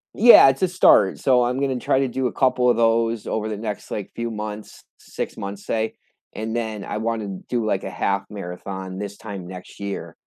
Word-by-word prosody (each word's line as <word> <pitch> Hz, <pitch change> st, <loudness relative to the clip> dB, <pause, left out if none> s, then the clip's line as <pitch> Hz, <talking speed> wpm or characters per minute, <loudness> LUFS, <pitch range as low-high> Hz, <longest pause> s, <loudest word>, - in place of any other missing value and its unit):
Yeah, 230 Hz, -, +9 dB
it's 135 Hz, -, -2 dB
a 185 Hz, -, +4 dB
start, 175 Hz, -, +4 dB
so 125 Hz, -2 st, +3 dB
I'm 125 Hz, +2 st, -1 dB
gonna 135 Hz, -2 st, -1 dB
try 130 Hz, -, +1 dB
to 135 Hz, -, +1 dB
do 130 Hz, +1 st, -1 dB
a -, -, -4 dB
couple 125 Hz, -2 st, +2 dB
of 120 Hz, -, +3 dB
those 115 Hz, -1 st, +2 dB
over 110 Hz, 0 st, -2 dB
the 105 Hz, -, -4 dB
next, 105 Hz, -1 st, -5 dB
like, 105 Hz, -, -5 dB
few 115 Hz, 0 st, -3 dB
months, 105 Hz, -1 st, -7 dB, 0.2 s
6 -, -, -6 dB
months, 100 Hz, 0 st, -6 dB
say, 110 Hz, 0 st, -1 dB, 0.4 s
and 110 Hz, +1 st, -4 dB
then 110 Hz, -3 st, -3 dB
I -, -, -4 dB
wanna 110 Hz, -4 st, -3 dB
do, 120 Hz, -3 st, 0 dB
like, 100 Hz, -3 st, 0 dB
a -, -, -4 dB
half 100 Hz, 0 st, -1 dB
marathon 95 Hz, -1 st, -7 dB
this 100 Hz, 0 st, -6 dB
time 100 Hz, -5 st, -8 dB
next 90 Hz, +1 st, -11 dB
year, 100 Hz, 0 st, -5 dB
110 Hz, 210 wpm, -22 LUFS, 100-120 Hz, 0.4 s, Yeah